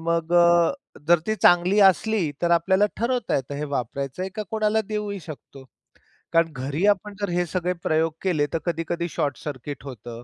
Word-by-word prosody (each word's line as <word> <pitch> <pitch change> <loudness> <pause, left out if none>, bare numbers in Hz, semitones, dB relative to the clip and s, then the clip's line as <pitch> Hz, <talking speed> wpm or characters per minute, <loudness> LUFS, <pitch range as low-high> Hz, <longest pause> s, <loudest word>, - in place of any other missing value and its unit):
मग 170 0 -1
अ, 170 -1 +5 0.4
जर 175 -1 +6
ती 215 - +1
चांगली 180 +4 +5
असली, 190 -2 0
तर 170 - +2
आपल्याला 190 +4 +3
ठरवता 240 0 -1
येतं 135 +1 -4
हे 150 - -3
वापरायचं 140 +3 -4
आहे 190 - -4
का 215 - -2
कोणाला 220 0 +1
देऊही 210 -2 -3
शकतो. 140 -4 -11 0.7
कारण 165 -1 +3
घरी 140 +8 -2
आपण 205 0 +1
जर 200 - -1
हे 175 0 0
सगळे 180 +1 -1
प्रयोग 160 0 +1
केले, 160 -6 +1
तर 165 - 0
कधी-कधी 170 0 -2
शॉर्टसर्किट 145 -1 -4
होतं. 120 -2 -9
170 Hz, 170 wpm, -24 LUFS, 145-190 Hz, 0.7 s, जर